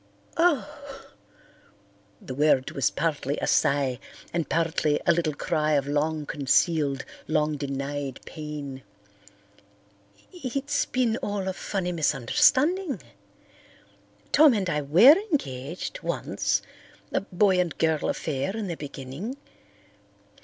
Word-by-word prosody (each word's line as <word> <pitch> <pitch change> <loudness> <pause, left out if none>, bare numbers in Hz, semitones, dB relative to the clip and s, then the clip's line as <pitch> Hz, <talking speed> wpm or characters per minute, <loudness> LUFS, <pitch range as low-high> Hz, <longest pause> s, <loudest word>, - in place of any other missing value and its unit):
"Oh!" 295 -4 -1 1.1
The 130 - -7
word 140 -1 +2
was 135 - +1
partly 145 -2 -1
a - - -2
sigh 140 -3 +2 0.3
and 170 -2 -1
partly 160 -2 +1
a - - +5
little 165 -3 0
cry 155 0 0
of 140 -2 +2
long 150 +1 -1
concealed, 140 0 +1 0.2
long 150 -1 +1
denied 140 -1 -4
pain. 150 -4 -7 1.5
"It's 285 -2 -2
been 240 -3 +1
all 205 -4 -3
a 190 - -1
funny 185 -1 -3
misunderstanding. 260 - +2 1.3
Tom 295 -4 +6
and 190 -4 -1
I 150 - 0
were 190 - +7
engaged 155 - -3
once—a - - -3
boy 190 0 +2
and 175 -3 -1
girl 160 -2 +1
affair 150 +7 -2
in 220 - -3
the 175 -3 -3
beginning. 145 - -7
160 Hz, 110 wpm, -26 LUFS, 145-210 Hz, 1.5 s, were